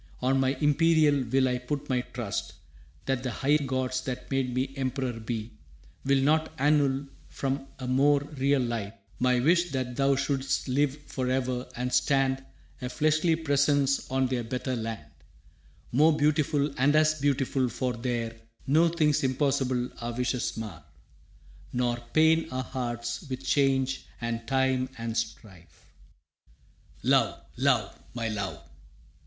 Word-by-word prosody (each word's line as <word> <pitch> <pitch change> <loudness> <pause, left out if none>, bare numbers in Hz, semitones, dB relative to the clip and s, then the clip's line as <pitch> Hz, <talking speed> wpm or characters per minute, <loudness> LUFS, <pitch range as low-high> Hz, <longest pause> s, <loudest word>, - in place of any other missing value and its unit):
On 135 +1 +2
my 135 +1 +2
imperial 150 0 +3
will 130 +3 +2
I 125 -1 0
put 140 +3 -4
my 125 -2 +1
trust 120 -5 -4 0.5
That 135 -2 0
the 130 - -2
high 140 +5 +2
gods, 130 -2 -1
that 130 +1 -5
made 135 -2 0
me 130 +2 -2
emperor 130 -1 -2
be, 110 0 -4 0.5
Will 135 0 +3
not 155 +2 +2
annul 140 -1 +2 0.2
from 135 0 -3
a 130 - -6
more 140 +3 +4
real 135 0 +2
life 115 -3 -3 0.2
My 125 0 +3
wish 170 +6 +3
that 130 -2 -2
thou 135 +1 +3
shouldst 135 0 -1
live 140 +2 +1
for 130 -2 -3
e'er 130 -1 -1
and 125 +1 -3
stand 135 -1 +2 0.4
A 125 - -3
fleshly 155 +4 +2
presence 140 -3 +1
on 130 0 +1
their 125 -2 -1
better 125 +2 -3
land, 110 -7 -4 0.9
More 150 +5 +4
beautiful 145 -1 +2
and 145 +3 +4
as 155 -1 +3
beautiful, 135 -2 +1
for 125 +2 -2
there 115 -1 -3 0.3
No 160 +5 +4
things 155 -3 +2
impossible 130 -2 +1
our 120 0 -4
wishes 125 0 -1
mar 100 -9 -6 0.9
Nor 120 -1 +1 0.2
pain 160 +1 +4
our 130 0 -3
hearts 120 -2 -4
with 130 0 -5
change 135 -2 +1
and 115 0 -3
time 130 -1 +1
and 115 -1 -4
strife. 110 -6 -6 1.1
«Love, - - +3 0.2
love, - - +1 0.2
my 115 -2 -2
love! 95 -8 -4
130 Hz, 140 wpm, -28 LUFS, 125-140 Hz, 1.1 s, more